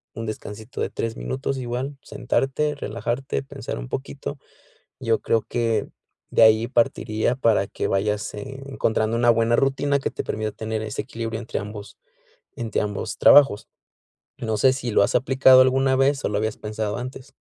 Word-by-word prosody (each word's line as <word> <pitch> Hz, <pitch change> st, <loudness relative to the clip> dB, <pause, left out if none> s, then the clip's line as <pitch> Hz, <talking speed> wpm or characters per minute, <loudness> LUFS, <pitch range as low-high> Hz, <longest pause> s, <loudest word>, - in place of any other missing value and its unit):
un 115 Hz, -, -5 dB
descansito 110 Hz, +2 st, -7 dB
de -, -, -1 dB
3 115 Hz, -1 st, -3 dB
minutos, 135 Hz, -, -3 dB
igual, 130 Hz, +3 st, -4 dB
sentarte, 140 Hz, +3 st, -1 dB
relajarte, 120 Hz, -, -3 dB
pensar -, -, -6 dB
un -, -, -7 dB
poquito, 140 Hz, +1 st, -5 dB, 0.6 s
yo 115 Hz, -3 st, +1 dB
creo 115 Hz, -, +1 dB
que 115 Hz, -2 st, -1 dB, 0.4 s
de -, -, +3 dB
ahí, 110 Hz, +1 st, +6 dB
partiría 115 Hz, -1 st, +1 dB
para 110 Hz, -6 st, +2 dB
que -, -, -3 dB
vayas 105 Hz, +1 st, -1 dB
e 135 Hz, +6 st, -7 dB
encontrando 115 Hz, -4 st, 0 dB
una 120 Hz, -, +2 dB
buena 115 Hz, 0 st, +2 dB
rutina 140 Hz, +1 st, +1 dB
que -, -, -2 dB
te -, -, -5 dB
permita 110 Hz, 0 st, -2 dB
tener 110 Hz, 0 st, -4 dB
ese 110 Hz, -1 st, -4 dB
equilibrio 115 Hz, -1 st, -5 dB
entre 115 Hz, -, -4 dB
ambos 105 Hz, 0 st, -9 dB, 0.6 s
entre 115 Hz, -2 st, -2 dB
ambos 105 Hz, -1 st, -4 dB
trabajos, 140 Hz, -8 st, +6 dB, 0.7 s
no 110 Hz, -2 st, -2 dB
sé, 130 Hz, +5 st, +5 dB
¿si 125 Hz, -3 st, -4 dB
lo 100 Hz, -, +4 dB
has -, -, 0 dB
aplicado 130 Hz, 0 st, +6 dB
alguna 130 Hz, +1 st, +3 dB
vez, 135 Hz, +1 st, +2 dB
o, -, -, +1 dB
lo 105 Hz, -, -1 dB
habías 110 Hz, 0 st, -1 dB
pensado 105 Hz, -1 st, -3 dB
antes? 130 Hz, +2 st, -8 dB
115 Hz, 170 wpm, -23 LUFS, 110-135 Hz, 0.7 s, ahí